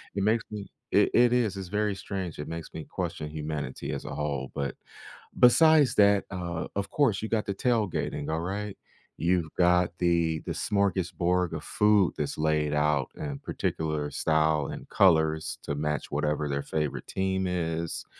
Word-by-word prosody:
it 100 - 0
makes 110 +2 +2
me 105 -2 -6 0.2
It - - +4
it 120 0 +5
is, 115 -5 +1
it's 95 -2 -6
very 105 -1 0
strange, 95 -4 -5
it 75 - -5
makes 85 -1 -7
me 80 - -6
question 75 -1 -4
humanity 75 -3 -4
as - - -5
a - - -5
whole, 70 -3 -3
but 70 -2 -2 0.6
besides 145 +1 +6
that, 100 -1 +5
uh, 85 -2 -4
of 100 0 -2
course, 135 -10 +2
you 110 - -4
got 110 -2 0
the 100 - -2
tailgating, 105 - -1
alright? 95 +6 -3 0.4
You've 85 -2 0
got 90 0 +4
the 85 -2 +1
the - - -1
smorgasbord 90 -3 0
of - - -5
food 105 -3 +3
that's 75 - -3
laid 75 -1 +1
out 75 -2 +1
in 70 -2 -5
particular 75 -2 -2
style 80 -1 +1
and - - -7
colors 80 -4 +3
to 70 - -3
match 75 +1 -2
whatever 75 0 0
their 70 0 -1
favorite 75 -3 -3
team 95 0 -1
is, 85 -2 -2
85 Hz, 165 wpm, -28 LUFS, 75-100 Hz, 0.6 s, besides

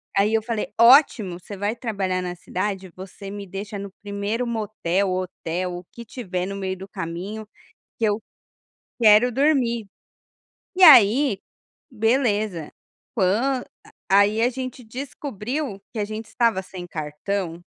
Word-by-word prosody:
aí 205 +2 +3
eu 225 - +3
falei: 225 -1 -3
"Ótimo, 230 - +6
você 200 +2 -9
vai 205 +3 -1
trabalhar 195 -6 -2
na 180 0 -4
cidade, 190 +1 -4
você 195 +1 -9
me 200 -1 -6
deixa 200 +2 -6
no 200 0 -6
primeiro 205 +4 -2
motel 200 -4 -1
ou 185 0 0
hotel, 180 0 -4
o 180 - -9
que 235 0 -10
tiver 185 -7 -4
no 200 +1 -5
meio 190 -1 -3
do 190 +1 -9
caminho, 190 +6 -6 0.5
que 225 - +2
eu 210 0 +1 0.8
quero 220 +2 +6
dormir.". 250 -5 +2 0.9
E 375 - -1
aí, 255 - +8 0.5
beleza, 215 - 0 0.4
quan 235 +7 +1 0.2
ah, - - -17 0.2
aí 200 +3 +5
a 240 - +4
gente 255 0 -6
descobriu 250 -1 -5
que 225 - -4
a 205 - 0
gente 215 +2 -6
estava 230 -5 +1
sem 180 -1 -9
cartão 165 +3 -4
205 Hz, 145 wpm, -23 LUFS, 190-235 Hz, 0.9 s, aí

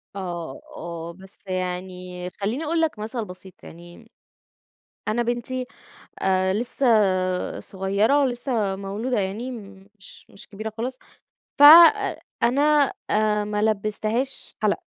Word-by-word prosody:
آه، 175 - -6 0.2
آه، 170 0 -6
بس 190 +2 -15
يعني 180 0 -4
خليني 220 - -3
أقول 325 +2 0
لَك 310 -9 -1
مثل 220 +1 -4
بسيط 185 -1 -13
يعني، 175 +1 -14 1.0
أنا 235 +3 +1
بنتي 245 +2 -3 0.6
آآ، 190 0 +2
لسه 205 -6 +1
صغيرة 200 +9 +1
ولسه 240 -6 -1
مولودة 205 +4 -2
يعني 210 +7 -3 0.5
مش 185 - -14
مش 195 - -15
كبيرة 215 +1 -6
خالص، 255 +3 -4 0.6
فَأ 290 - +8 0.8
أنا 285 +3 +3 0.2
آآ 210 0 +2
ما 210 0 -2
لبستهاش 215 +4 -1
حلق. - - +1
210 Hz, 115 wpm, -24 LUFS, 185-240 Hz, 1.0 s, فَأ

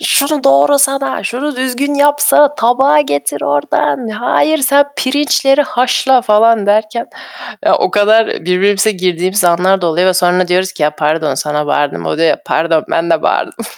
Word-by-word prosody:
"Şunu 290 0 0
doğrasana, 275 - +2
şunu 275 +3 -4
düzgün 260 +3 -2
yapsa, 290 0 +2
tabağı 265 +6 +2
getir 145 - -3
ordan, 145 - -1
hayır 245 +8 0
sen 280 +1 +3
pirinçleri 275 +1 +1
haşla." 255 0 0
falan 215 -1 +2
derken 215 +3 -1 0.6
ya, - - +3
o - - -1
kadar 215 +2 +2
birbirimize 195 +5 0
girdiğimiz 185 0 -2
anlar 180 +3 +2
da 175 - 0
oluyor 175 +3 0
ve 185 - +2
sonra 180 0 +1
diyoruz 185 +1 0
ki, - - -7
"Ya, 150 - +2
pardon 155 +1 -1
sana 150 0 -3
bağırdım." 145 0 -2
O - - -3
diyor, 165 -1 +2
"Pardon 160 -1 -1
ben 170 0 -1
de 160 -1 0
bağırdım." - - -2
210 Hz, 155 wpm, -13 LUFS, 170-270 Hz, 0.6 s, sen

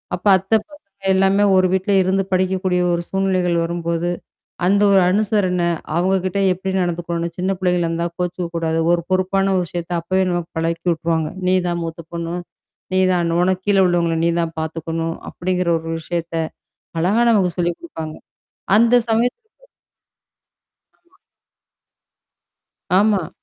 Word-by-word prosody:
அப்ப 180 - -13
அத்த 190 +3 -12 0.2
பசங்க 200 -10 -17
எல்லாமே 195 +1 +3
ஒரு 185 0 +4
வீட்ல 190 +2 +1
இருந்து 190 +1 +1
படிக்கக்கூடிய 185 -1 +1
ஒரு 170 - 0
சூழ்நிலைகள் 185 -2 +1
வரும்போது. 170 0 -2 0.6
அந்த 200 +2 +3
ஒரு 195 -1 +6
அனுசரன, 195 -3 +1 0.3
அவுங்க 185 +3 +2
கிட்ட 185 +1 -1
எப்பிடி 190 +1 -4
நடந்துக்கணும்னு 170 -1 -2
சின்ன 185 +2 0
புள்ளைங்களா 180 -2 +1
இருந்தா, 170 +1 -1
கோச்சுக்கக்கூடாது. 170 -2 -2
ஒரு 175 0 +2
பொறுப்பான 195 +1 +1
விஷயத்த 175 0 -6
அப்பவே 185 +3 0
நமக்கு 175 -1 -2
பழக்கி 165 +1 -2
விட்டுருவாங்க. 160 -1 -1 0.2
"நீதான் 180 -2 +1
மூத்த 165 +1 -6
பொண்ணு. 170 0 -4 0.6
நீதான் 180 -2 +2
உனக்கு 185 +1 +1
கீழே 200 -1 +4
உள்ளவங்கள 170 -2 +1
நீ 170 - +3
தான் 165 -1 -3
பாத்துக்கணும்" 165 +1 -3
அப்பிடிங்கிற 180 0 -1
ஒரு 165 0 -8
விஷயத்த 170 +1 -4 0.7
அழகா 195 +8 +2
நமக்கு 190 -5 +3
சொல்லிக் 175 -1 0
குடுப்பாங்க. 160 - -7 0.6
அந்த 230 +2 +4 0.2
சமயத்து 245 - 0 1.5
ஆமா. 350 +2 -33 1.8
ஆமா. 200 -4 +2
180 Hz, 130 wpm, -20 LUFS, 170-190 Hz, 1.8 s, ஒரு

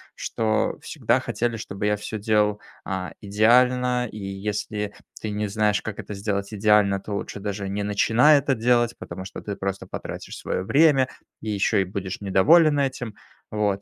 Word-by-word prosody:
что 110 -1 -1
всегда - - 0
хотели, 120 0 -2
чтобы 100 -2 -5
я 105 0 +2
всё 105 +1 -5
делал, 105 0 +1 0.3
а, 95 -1 -3
идеально, 125 +4 +3
и - - -9
если 105 +1 -4 0.3
ты 110 - -3
не 105 0 -2
знаешь, 105 0 +1
как 110 -2 -6
это 105 - -6
сделать 100 0 -2
идеально, 105 -1 +3
то 105 +2 -7
лучше 100 0 -4
даже 100 -1 -4
не 100 +1 -2
начинай 115 +8 +4
это 140 -1 0
делать, 120 0 +2
потому 95 +2 -8
что 95 - -8
ты 100 - -5
просто 95 0 -4
потратишь - - -7
свое 90 - -3
время, 140 +3 +4 0.3
и 110 - -5
еще 105 0 +2
и - - +2
будешь 95 0 -5
недоволен 145 - +5
этим. 130 -5 -2 0.4
Вот. 105 -2 0
105 Hz, 170 wpm, -24 LUFS, 100-120 Hz, 0.4 s, недоволен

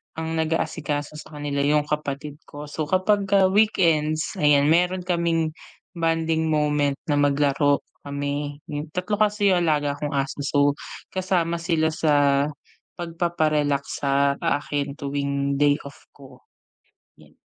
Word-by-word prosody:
ang 160 0 -3
nag-aasikaso 155 -2 -2
sa 155 -1 -12
kanila 145 -1 -3
'yung 145 +1 +3
kapatid 150 0 -4
ko, 145 0 -9
so 150 +1 -4
kapagka 195 +1 +3
weekends 165 -7 +2
ayan 145 0 +4
meron 180 +2 +2
kaming 170 -3 0 0.4
bonding 165 -2 0
moment 150 -2 +1 0.2
na 145 - +2
maglaro 145 0 +2 0.2
kami. 145 +1 -4 0.3
Tatlo 200 +3 -1
kasi 210 -2 +3
'yung 175 -2 +2
alaga 145 -2 0
kong 145 -1 -3
aso 135 +1 -2
so 145 - +1 0.5
kasama 175 -3 0
sila 165 -2 +1
sa 145 -3 +2 0.5
pagpapa-relax 155 -4 0 0.2
sa 140 0 +1
akin 145 -1 -1
tuwing 140 0 -2
day 145 -1 +4
off 140 0 -13
ko, 130 -3 -15 0.8
'yan. - - -21
150 Hz, 125 wpm, -24 LUFS, 145-165 Hz, 0.8 s, ayan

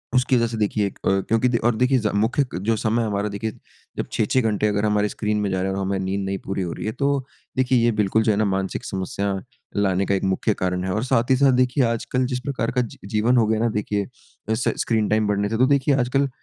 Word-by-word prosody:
उसकी 125 +1 +3
वज़ह 115 - +2
से 115 0 -5
देखिए 105 -1 +1
एक - - -9
अ - - +5 0.2
क्योंकि 115 +3 +2
दे 120 - +1
और 120 - +2
देखिए 125 +3 +3
ज 105 -2 0
मुख्य 115 +8 +2 0.2
जो 115 +1 +2
समय 115 +2 +1
हमारा 105 -1 -1
देखिए 105 +2 -3 0.5
जब - - -1
6-6 110 +4 +1
घंटे 105 -2 +1
अगर 105 0 0
हमारे 105 0 +2
स्क्रीन 105 0 -2
में 100 - 0
जा 95 0 0
रहा 95 +1 -1
है 95 - -3
और 100 - -2
हमारी 95 0 -1
नींद 95 +1 -2
नहीं 95 0 -2
पूरी 95 0 -2
हो 90 -2 -3
रही - - -6
है। 110 - -1
तो 140 +3 0 0.4
देखिए 130 0 +3
ये 120 - +4
बिल्कुल 105 0 +1
जो 110 - +3
है 100 - 0
ना 110 - +2
मानसिक 95 -1 -2
समस्या 100 +1 -2 0.4
लाने 100 -2 +1
का 100 - +1
एक 95 - -2
मुख्य 95 +3 +1
कारण 90 -1 -2
है 95 - -2
और 105 - -1
साथ 125 -2 +1
ही - - +6
साथ 140 -1 +5
देखिए 125 +2 +2
आजकल 115 +2 -1
जिस 125 0 -2
प्रकार 130 -3 -2
का 125 0 +1
जी-जीवन 110 +2 0
हो 115 - +4
गया 110 0 +1
ना 115 - +2
देखिए 105 -1 -2 0.5
स 120 - 0
स्क्रीन 110 -2 +1
टाइम 110 0 +2
बढ़ने 105 0 0
से। 110 - -1
तो 130 - +5
देखिए 140 0 +3
आजकल 135 +3 +1
110 Hz, 260 wpm, -23 LUFS, 100-125 Hz, 0.5 s, ही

